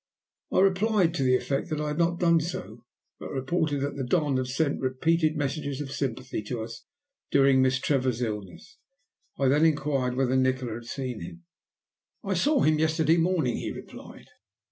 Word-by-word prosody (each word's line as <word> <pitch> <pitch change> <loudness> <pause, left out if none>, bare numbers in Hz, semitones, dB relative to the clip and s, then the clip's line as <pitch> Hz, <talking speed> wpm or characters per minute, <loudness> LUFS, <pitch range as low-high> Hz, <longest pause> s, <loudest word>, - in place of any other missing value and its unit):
I - - +3
replied 195 -2 +3
to 170 - -2
the 130 -1 +4
effect 135 +5 -2
that 155 -1 -2
I 150 0 -2
had 150 +2 -3
not 170 0 +1
done 170 -2 +4
so, 120 - -6 0.3
but - - -7
reported 145 +2 -1
that 140 0 -2
the 135 - -2
Don 145 +1 +1
had 130 -1 -1
sent 140 +3 -1
repeated 155 +5 +1
messages 145 -1 -2
of 140 -2 -5
sympathy 130 -4 -3
to 115 0 -4
us 115 0 -9 0.4
during 135 -1 +4
Miss 130 0 +3
Trevor's 130 -3 0
illness. 105 - -6 0.6
I 135 - +2
then 145 +4 +3
inquired 140 -5 +1
whether 130 0 +1
Nikola 130 -2 +1
had 115 +1 -8
seen 125 -3 -5
him? 85 0 -9 0.8
"I 195 - -1
saw 285 - +2
him 155 0 +3
yesterday 160 +1 +2
morning," 165 -7 +1
he - - -4
replied. - - -11
140 Hz, 175 wpm, -27 LUFS, 130-160 Hz, 0.8 s, the